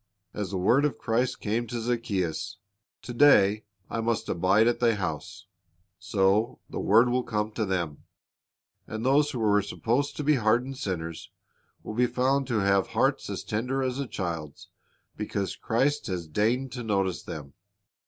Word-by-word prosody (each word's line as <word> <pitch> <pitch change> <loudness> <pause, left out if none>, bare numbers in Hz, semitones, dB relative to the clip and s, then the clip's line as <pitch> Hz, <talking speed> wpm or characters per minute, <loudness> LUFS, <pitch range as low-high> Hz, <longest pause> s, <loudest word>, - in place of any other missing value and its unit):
As 105 -3 -3
the 95 - -3
word 120 +10 +3
of 150 - 0
Christ 120 +2 -1
came 115 +3 -1
to 120 +1 -4
Zacchaeus, 105 -8 -2 0.5
"To 120 - -6
day 110 -6 +5 0.2
I 115 - -3
must 115 0 -1
abide 95 +6 +3
at 120 - +1
thy 115 -2 +3
house,'"' 90 -1 -5 0.5
so 100 +2 +1
the - - -5
word 115 +5 +5
will 125 +1 +1
come 105 -2 -2
to 110 0 -2
them; 85 -6 -3 0.8
and 110 +2 -5
those 145 +3 +4
who 130 - -4
were 105 -2 +3
supposed 120 +7 -1
to 150 - -2
be 150 0 +3
hardened 120 +4 +1
sinners 85 -4 -4 0.5
will - - -6
be 125 +2 +2
found 135 +2 +1
to 115 -5 0
have 100 0 +2
hearts - - +1
as - - -4
tender 125 +5 -1
as 130 +1 -2
a 140 - -2
child's 80 -8 -5 0.5
because 100 -2 -3
Christ 135 +6 0
has 90 -4 -3
deigned 115 - 0
to 125 -1 -5
notice 95 -4 0
them. 70 -3 -8
110 Hz, 165 wpm, -27 LUFS, 95-125 Hz, 0.8 s, day